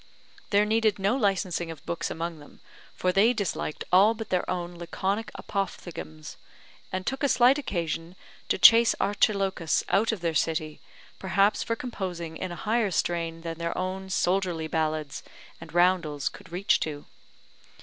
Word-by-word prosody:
There 205 0 +4
needed 220 -1 +2
no 200 +4 +1
licensing 190 -7 0
of 160 -3 -9
books 170 -1 -3
among 165 -1 -4
them, 145 - -16 0.4
for 185 - +1
they 210 +6 +4
disliked 200 -8 -3
all 200 +5 +6
but 225 0 -7
their 180 -1 0
own 175 -1 -3
laconic 195 +5 -2
apophthegms, 80 - -5 0.5
and 185 0 -3
took 265 0 -2
a 285 - +2
slight 255 +3 +5
occasion 170 - -3 0.3
to - - +2
chase 230 +4 +7
Archilochus 195 -4 +1
out 215 +4 +3
of 215 -5 -4
their 165 -1 0
city, 155 -1 -1 0.4
perhaps 195 +2 +2
for 230 - -1
composing 180 -9 -5
in 185 +2 -4
a - - -5
higher 220 +2 0
strain 165 -2 -1
than 165 0 -6
their 170 0 -3
own 190 +1 -3
soldierly 180 -3 0
ballads 155 -2 -2 0.4
and 165 - -10
roundels 175 -5 +2
could - - -14
reach 185 +4 +2
to. 145 -2 -4
185 Hz, 155 wpm, -27 LUFS, 165-205 Hz, 0.5 s, chase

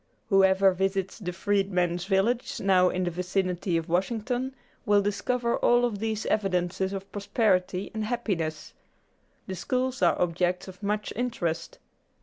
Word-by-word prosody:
Whoever 195 -1 +5
visits 190 +2 -1
the 180 -4 -4
Freedmen's 180 -2 0
Village 210 +5 0
now 185 -2 +4
in 185 - -1
the 175 - -1
vicinity 180 0 -1
of 165 - -3
Washington 235 +8 -1 0.3
will 205 -3 +3
discover 235 +4 0
all 240 0 +4
of 215 -4 -2
these 220 0 -2
evidences 190 -2 0
of 195 0 -6
prosperity 200 -2 0
and 220 -1 -2
happiness. 185 -10 -3 0.7
The 190 - -5
schools 255 +8 -2
are - - +3
objects 180 +1 0
of 185 -1 -11
much 210 +1 -2
interest. 175 -9 -2
195 Hz, 135 wpm, -27 LUFS, 180-215 Hz, 0.7 s, Whoever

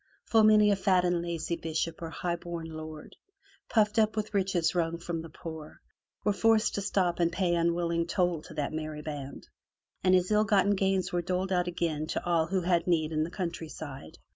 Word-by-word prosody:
Full 225 -1 +4
many 210 -1 +6
a - - +4
fat 185 -2 +2
and 175 -1 +1
lazy 170 -1 -2
bishop 165 0 -3
or 165 - -4
high 175 +1 -2
bom 170 -1 -6
lord, 155 -1 -8 0.5
puffed 215 -1 +3
up 220 0 +2
with 215 0 -3
riches 185 -4 +1
wrung 170 -1 0
from 170 -1 -4
the 165 - -9
poor, 160 -1 -9 0.4
was 205 -1 0
forced 225 -1 +3
to 200 - -2
stop 185 -3 0
and 170 -1 +2
pay 180 -1 0
unwilling 170 0 +1
toll 175 -3 0
to 160 - -12
that 150 -1 -2
merry 155 -1 -5
band, 145 -3 -7 0.6
and 185 0 +5
his 185 +2 +1
ill 210 0 +4
gotten 205 -1 +3
gains 190 -2 0
were 175 - +1
doled 185 +2 -2
out 180 -1 +1
again 165 -3 -2
to - - -3
all 170 -2 +2
who 190 +2 0
had 175 -1 +1
need 160 -3 +2
in 155 -1 0
the 160 - -3
countryside. 160 -6 -6
175 Hz, 200 wpm, -29 LUFS, 160-190 Hz, 0.6 s, many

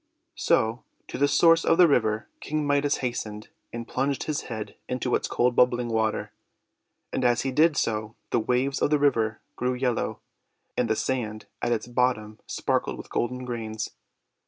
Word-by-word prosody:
So 120 - +1 0.3
to - - -5
the 145 - +4
source 165 +3 +5
of 165 - +3
the 180 -1 +8
river 110 -6 +1
King 155 0 -2
Midas 145 0 +2
hastened, 110 -3 -4 0.2
and 115 0 -6
plunged 135 +1 -1
his 155 -2 -2
head 110 -3 -5
into 125 0 -1
its - - +1
cold 125 0 +1
bubbling 125 -1 +3
water. 110 -1 0 0.8
And - - 0
as 120 -1 +3
he 135 - -1
did 155 +3 +4
so 110 0 -1 0.2
the 120 - +3
waves 125 +5 0
of - - +3
the 150 - +4
river 115 -7 +1
grew 125 +1 0
yellow, 125 -2 -1 0.6
and 120 -2 0
the 110 - +3
sand 110 -4 -2 0.2
at 120 - 0
its 115 - 0
bottom 120 -3 0
sparkled - - -1
with - - -10
golden 125 +1 -1
grains. 110 -3 -4
125 Hz, 170 wpm, -26 LUFS, 110-140 Hz, 0.8 s, the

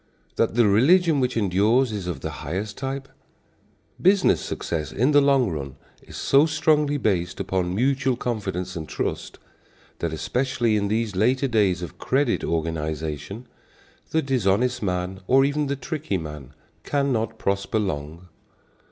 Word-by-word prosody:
That - - +1
the 120 -1 +5
religion 155 - +4
which 125 -2 0
endures 110 +5 +2
is 100 -4 -4
of 80 -7 -4
the - - -4
highest 95 +7 -4
type? 135 +1 -4 0.9
Business 190 0 +4
success 80 -2 -4
in 125 - +2
the 145 -1 +6
long 135 -6 +3
run, 70 -4 -5 0.3
is - - -11
so 140 +3 +4
strongly 150 -1 +2
based 90 -8 -1
upon 90 -1 -1
mutual 135 +2 +1
confidence 95 -7 -3
and 80 -2 -6
trust, - - -4 0.6
that, 85 - -2
especially 120 - 0
in 100 -1 0
these 110 -1 -1
later 125 +7 +2
days 100 -7 +1
of 85 - -8
credit 135 -1 +1
organization, 80 - -3 0.6
the 160 0 +1
dishonest 125 -1 +1
man 90 -1 -2
or 135 +1 +5
even 145 +1 0
the 140 - -1
tricky 140 -4 -3
man 75 -5 -8 0.3
cannot 135 -6 -1
prosper 100 +2 -1
long. 85 -3 -4
110 Hz, 145 wpm, -24 LUFS, 90-135 Hz, 0.9 s, the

